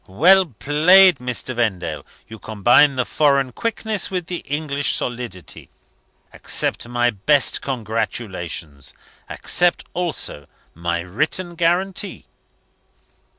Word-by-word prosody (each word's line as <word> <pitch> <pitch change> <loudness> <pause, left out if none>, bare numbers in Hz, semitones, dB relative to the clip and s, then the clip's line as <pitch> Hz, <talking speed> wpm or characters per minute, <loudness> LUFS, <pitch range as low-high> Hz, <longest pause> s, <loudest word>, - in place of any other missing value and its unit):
"Well 180 - +4
played, 160 - +5
Mr. 125 0 -4
Vendale! 95 -9 -2 0.2
You 110 0 -11
combine 120 +8 +3
the 125 -1 0
foreign 140 -3 +1
quickness 220 - -3
with 180 -3 -3
the 180 0 -4
English 145 -2 -2
solidity. 120 -9 -6 0.6
Accept - - -2
my 120 0 +1
best 130 +7 +1
congratulations. 105 - -5 0.3
Accept, 175 -1 +1
also, 165 - -3 0.3
my 85 +1 -3
written 150 - -1
guarantee." 180 +4 -1
130 Hz, 100 wpm, -20 LUFS, 105-170 Hz, 0.6 s, played